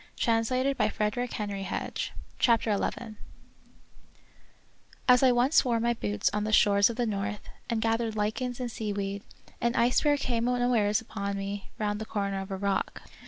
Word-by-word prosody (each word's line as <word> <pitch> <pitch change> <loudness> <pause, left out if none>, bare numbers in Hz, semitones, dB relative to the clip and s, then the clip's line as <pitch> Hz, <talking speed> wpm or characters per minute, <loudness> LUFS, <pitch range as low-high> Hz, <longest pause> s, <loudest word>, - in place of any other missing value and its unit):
io8 255 +4 +1
The - - +2
Wonderful 210 -1 -1
History 195 -1 -3 0.3
CHAPTER 230 -4 +3
XL - - -2 2.0
As 250 -1 +6
I 260 -1 +6
once 245 +5 +4
wore 240 -3 +1
my 235 +1 +1
boots 105 - -2
on 210 0 0
the 215 - -2
shores 200 -1 +5
of 235 - -4
the 245 - 0
north, 205 -1 -3 0.2
and 225 -2 0
gathered 225 -1 0
lichens 235 +4 -2
and 245 -2 -3
sea 215 -2 -3
weed, 200 0 -3 0.4
an 235 0 +1
ice 240 +2 +3
bear 295 -1 +3
came 240 -3 -1
unawares 245 -3 +2
upon 200 -3 -4
me 200 0 -5
round 210 0 -2
the - - -4
corner 200 -2 -2
of 195 - -8
a 195 - -3
rock. 200 0 -2
220 Hz, 165 wpm, -28 LUFS, 200-240 Hz, 2.0 s, As